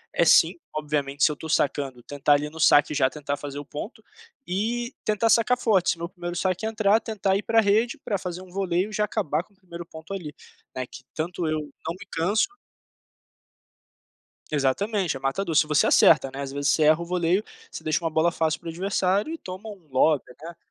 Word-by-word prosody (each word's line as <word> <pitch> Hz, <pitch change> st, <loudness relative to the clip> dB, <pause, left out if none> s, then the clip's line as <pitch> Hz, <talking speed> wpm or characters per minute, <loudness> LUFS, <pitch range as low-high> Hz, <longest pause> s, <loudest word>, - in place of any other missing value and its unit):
é -, -, +3 dB
sim, -, -, +6 dB, 0.2 s
obviamente 145 Hz, -2 st, -1 dB
se 150 Hz, -, +5 dB
eu -, -, -2 dB
estou 160 Hz, +2 st, -9 dB
sacando 135 Hz, -4 st, 0 dB
tentar 145 Hz, 0 st, +1 dB
ali 145 Hz, +1 st, +1 dB
no 160 Hz, -, -12 dB
saque 145 Hz, -1 st, +5 dB
já 130 Hz, -2 st, +3 dB
tentar 145 Hz, 0 st, -4 dB
fazer 145 Hz, 0 st, -6 dB
o 145 Hz, -, -8 dB
ponto, 210 Hz, -, -8 dB, 0.4 s
e 235 Hz, +6 st, -2 dB
tentar 215 Hz, +2 st, +1 dB
sacar 235 Hz, +2 st, +4 dB
forte, 195 Hz, -7 st, +2 dB
se -, -, -3 dB
meu 170 Hz, 0 st, -5 dB
1º 175 Hz, -1 st, -6 dB
saque 185 Hz, +3 st, -1 dB
entrar, 215 Hz, -1 st, +3 dB
tentar 200 Hz, -4 st, -1 dB
ir 205 Hz, -, -4 dB
para 225 Hz, 0 st, +3 dB
rede 220 Hz, +3 st, +2 dB
para 200 Hz, -, -1 dB
fazer 180 Hz, -1 st, -6 dB
um 185 Hz, -, -13 dB
voleio 185 Hz, 0 st, 0 dB
e -, -, -11 dB
já 210 Hz, 0 st, +1 dB
acabar 170 Hz, -7 st, -1 dB
com 200 Hz, -, -30 dB
o -, -, -32 dB
1º 175 Hz, -3 st, -9 dB
ponto 160 Hz, +4 st, -10 dB
ali, 160 Hz, -6 st, -6 dB, 0.4 s
né, 130 Hz, -1 st, -3 dB
que 135 Hz, -, -12 dB
tanto 170 Hz, +1 st, -3 dB
eu 155 Hz, 0 st, 0 dB, 0.3 s
não 165 Hz, -, -3 dB
me -, -, -10 dB
canso 195 Hz, -, +1 dB, 2.0 s
Exatamente, 160 Hz, -, 0 dB
é -, -, -11 dB
matador, 160 Hz, +6 st, -2 dB
se 150 Hz, -, +5 dB
você 150 Hz, -1 st, +3 dB
acerta, 135 Hz, -, +5 dB
né, 135 Hz, -, -6 dB
às 135 Hz, -1 st, -5 dB
vezes 140 Hz, +1 st, -1 dB
você 155 Hz, -, +2 dB
erra 155 Hz, +2 st, +5 dB
o -, -, -4 dB
voleio, 180 Hz, +3 st, +1 dB, 0.3 s
você -, -, -8 dB
deixa 155 Hz, +2 st, 0 dB
uma 165 Hz, -, -1 dB
bola 160 Hz, +2 st, +2 dB
fácil 160 Hz, -2 st, 0 dB
para -, -, -11 dB
o -, -, -2 dB
adversário 195 Hz, -, 0 dB
e -, -, -5 dB
toma 185 Hz, +4 st, -8 dB
um 190 Hz, -6 st, -12 dB
lobby, 145 Hz, +3 st, +3 dB, 0.2 s
né. 165 Hz, +3 st, -9 dB
170 Hz, 215 wpm, -25 LUFS, 150-200 Hz, 2.0 s, sim